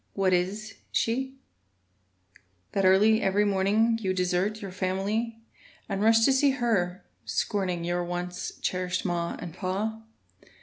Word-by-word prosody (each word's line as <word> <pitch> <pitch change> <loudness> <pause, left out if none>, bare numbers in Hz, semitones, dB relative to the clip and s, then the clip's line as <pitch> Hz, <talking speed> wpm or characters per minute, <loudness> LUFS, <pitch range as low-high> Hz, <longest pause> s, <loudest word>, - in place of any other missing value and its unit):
What 190 -2 +2
is 200 +5 -1
she 265 +3 0 1.4
That 195 -1 +1
early 210 +4 +5
every 200 +2 +2
morning 205 +4 +2
You 190 -2 0
desert 185 +4 0
your 195 -2 -7
family 200 +5 -1 0.5
And 195 - -2
rush 225 +1 +5
to 270 - +5
see 275 +2 +4
her, 195 -7 0 0.2
scorning 185 -4 -1
Your 175 +1 -1
once 175 +1 -4
cherished 185 0 -1
ma 170 -2 -1
and 170 - -7
me? 220 +4 -5
195 Hz, 130 wpm, -27 LUFS, 180-220 Hz, 1.4 s, early